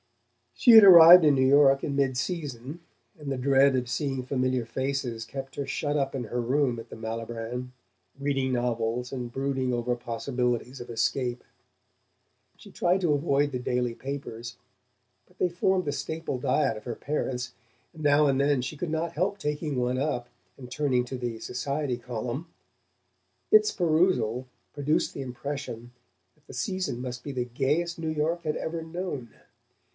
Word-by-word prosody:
She 245 - +5
had 220 -2 +11
arrived 175 -2 +10
in 150 - +6
New 130 0 +3
York 135 0 +5
in 140 - -2
midseason, 140 +1 -2 0.4
and 145 -3 -6
the 135 - -2
dread 135 +1 +4
of 125 -1 -1
seeing 135 +1 -2
familiar 130 -1 -1
faces 125 -2 -3
kept 135 +2 -7
her 140 - -3
shut 145 +2 -2
up 135 -1 -1
in 125 -3 -3
her 120 +3 -2
room 125 0 +1
at 115 +1 -10
the - - -9
Malibran, 115 +2 -5 0.5
reading 135 -2 0
novels 120 0 -1
and 125 -3 -5
brooding 135 -1 -1
over 120 0 -1
possibilities 125 +1 -3
of 120 - -9
escape. 120 +2 -1 1.1
She - - -14
tried 180 +2 +1
to 165 -5 +2
avoid 145 -1 +1
the 125 - -3
daily 125 -1 -1
papers, 125 -3 -7 0.7
but 180 - -27
they 180 - +1
formed 185 +2 +1
the 145 - -1
staple 145 -1 -4
diet 125 -3 +1
of 105 - -10
her 120 - -4
parents, 125 -4 -3 0.4
and 155 -2 -10
now 145 0 +4
and 135 -1 +2
then 140 -1 +2
she 135 +4 -5
could 165 +1 -4
not 160 +1 -2
help 185 +5 -1
taking 150 -4 -3
one 125 +1 0
up 125 -4 -2 0.3
and 125 -2 -10
turning 130 -2 0
to 130 +1 -6
the 120 -2 -4
"Society 140 +2 -3
Column." 120 +5 -5 1.0
Its 430 0 +6
perusal 155 - +1 0.3
produced 145 +2 0
the - - -6
impression 125 -2 -6 0.4
that 150 -1 -34
the - - -12
season 185 - -3
must 125 -1 -6
be 145 - -5
the 125 -2 -2
gayest 145 +8 -1
New 160 -1 -3
York 160 +3 -1
had 155 -2 -1
ever 165 0 -4
known. 160 -7 -5
135 Hz, 165 wpm, -27 LUFS, 125-150 Hz, 1.1 s, had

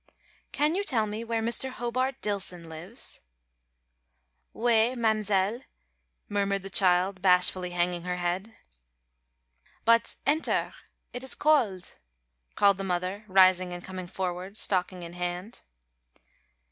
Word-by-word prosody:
"Can 300 +2 +1
you 395 +3 -1
tell 240 - +2
me 215 +2 -5
where 230 -1 -2
Mr. 235 +3 +1
Hobart 255 +2 -3
Dillson 185 -5 -3
lives?" 170 +10 -6 1.3
"Ou 240 - -2
ay, 235 +2 +3
ma'mzelle," 215 -1 0 0.7
murmured 200 -1 -1
the 195 - -8
child, 185 0 +3
bashfully 180 -1 +3
hanging 175 0 -1
her 180 +1 -3
head. 180 +5 -3 1.3
"But 230 0 +3
enter 300 +3 +1 0.4
it 245 - -6
is 265 - +3
cold," 240 -12 +1 0.6
called 200 -1 +4
the 195 - -4
mother, 185 +3 -3
rising 185 -1 +4
and 175 0 -8
coming 185 -1 -7
forward, 185 +2 -4
stocking 185 -3 +3
in 170 0 -9
hand. 180 +4 -5
195 Hz, 120 wpm, -27 LUFS, 180-230 Hz, 1.3 s, called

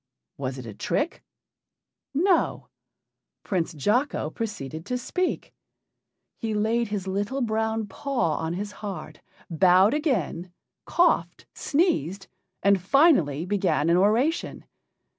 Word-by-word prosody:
Was 135 -1 -4
it 130 - -8
a 110 - -7
trick? 295 - -2 0.9
No; 345 +5 +1 0.7
Prince 180 -5 -1
Jocko 210 - 0
proceeded 160 - -5
to 250 - -1
speak. 365 +9 -2 0.9
He 220 -2 -2
laid 225 +3 +1
his 205 -2 -3
little 205 +8 -2
brown 220 -1 0
paw 240 - -1
on 160 +1 -2
his 205 +3 -4
heart, 205 -2 -7 0.3
bowed 185 - +5
again, 190 - -1 0.3
coughed, 250 - +1
sneezed, 200 - 0 0.4
and 200 -2 +4
finally 185 - +3
began 185 -5 +1
an 175 - +4
oration. 230 - +1
205 Hz, 110 wpm, -25 LUFS, 175-250 Hz, 0.9 s, bowed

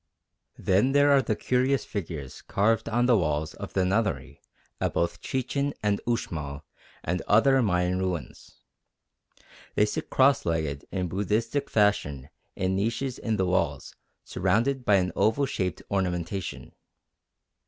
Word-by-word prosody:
Then 105 +9 +2
there 145 0 +5
are 140 -1 +6
the 110 -3 -1
curious 130 +4 +1
figures 80 - -6
carved 110 +4 +1
on 120 +2 +2
the 125 -1 +5
walls 80 -5 0
of - - -8
the 95 -1 +2
Nunnery 100 -7 -1 0.4
at - - -1
both 85 0 -1
Chichen 140 +2 -2
and 105 -1 +1
Uxmal 75 -11 -3 0.4
and 90 +2 -1
on 105 - +5
other 135 +3 +4
Mayan 90 -3 +1
ruins. 90 -8 -5 1.1
They 105 - +4
sit 105 - -4
cross 135 +1 +4
legged 80 -4 -2
in 95 -2 -1
Buddhistic 105 - -1
fashion 75 - +1 0.2
in 95 0 0
niches 115 +6 -2
in 110 -2 -1
the 95 - +1
walls 85 -6 -1 0.3
surrounded 125 +4 0
by 105 - +5
an 90 -1 +1
oval 110 +8 +2
shaped 90 - -3
ornamentation. 90 -1 -3
100 Hz, 140 wpm, -27 LUFS, 90-120 Hz, 1.1 s, are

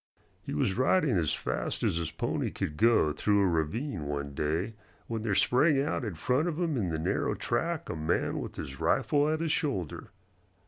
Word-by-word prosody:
He - - -5
was 95 +9 0
riding 140 - +3
as 80 -4 +1
fast - - -3
as - - +1
his 85 -2 -2
pony - - -2
could 75 - -4
go 110 -6 +4
through 100 +4 +2
a - - +4
ravine 85 - -1
one 70 -1 -3
day 80 +9 -1 0.3
when 115 -1 -3
there 110 -3 0
sprang 135 - +4
out 140 -1 -1
in 105 -7 -4
front 125 - +1
of 170 -1 -2
him 165 -4 0
in 100 -8 0
the 80 - -1
narrow 80 - 0
track - - -1
a - - -4
man 80 0 0
with - - -6
his 65 -1 -7
rifle 145 0 +2
at 155 +1 0
his 165 -2 0
shoulder. 110 - -2
105 Hz, 195 wpm, -29 LUFS, -, 0.3 s, go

